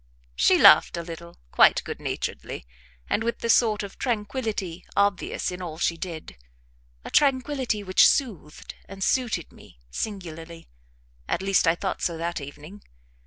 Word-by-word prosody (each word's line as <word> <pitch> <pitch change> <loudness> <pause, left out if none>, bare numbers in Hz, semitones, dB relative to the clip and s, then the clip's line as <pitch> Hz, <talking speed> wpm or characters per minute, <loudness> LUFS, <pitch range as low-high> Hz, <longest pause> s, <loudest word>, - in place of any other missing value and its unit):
She 65 - +4
laughed - - +7
a 170 - -4
little, 170 0 -10
quite - - +5
good - - -7
naturedly, - - -5 0.4
and 225 - 0
with 235 +1 -3
the 230 - +2
sort 215 -3 +3
of 200 - -10
tranquillity 210 -6 -3
obvious 200 -2 0
in 180 +1 -7
all 165 -3 -6
she 170 0 0
did 165 - -8 0.7
a - - -7
tranquillity 260 -5 +1
which 185 -1 +5
soothed 195 - -2 0.2
and 195 0 -6
suited 235 -10 0
me - - -18
singularly, 165 - -6 0.6
at 190 - -2
least 195 -3 +2
I 165 - +4
thought 190 +1 -4
so 170 -2 -1
that 170 -1 -3
evening. 150 +8 -11
185 Hz, 150 wpm, -25 LUFS, 165-215 Hz, 0.7 s, laughed